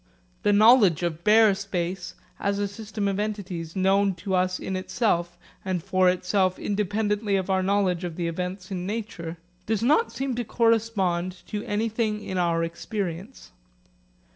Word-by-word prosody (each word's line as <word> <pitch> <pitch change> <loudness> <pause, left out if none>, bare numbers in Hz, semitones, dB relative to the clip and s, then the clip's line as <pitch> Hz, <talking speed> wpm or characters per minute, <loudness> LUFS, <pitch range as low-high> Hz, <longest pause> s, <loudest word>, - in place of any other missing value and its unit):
The 205 - +3
knowledge 205 - +6
of 170 -1 -2
bare 215 -1 +6
space, 185 -2 -4 0.2
as 200 0 0
a 205 0 0
system 210 0 -4
of 195 0 -1
entities 190 -6 -4
known 195 0 +2
to 195 +1 -4
us 185 0 +1
in 190 - -4
itself 180 -3 -1 0.3
and 185 -3 -2
for 185 -1 +3
itself 185 +1 +1
independently 210 0 0
of 190 0 -1
our 190 0 +2
knowledge 190 -2 +1
of 175 -2 -4
the 170 -1 -2
events 180 +3 -4
in 180 -1 -3
nature, 205 -6 -5 0.3
does 220 0 0
not 305 - +3
seem 270 -1 -2
to 240 - 0
correspond 210 -7 0
to 210 0 -3
anything 215 0 -1
in 185 -1 -3
our 170 -1 +1
experience. 185 +5 -5
195 Hz, 155 wpm, -25 LUFS, 180-210 Hz, 0.3 s, knowledge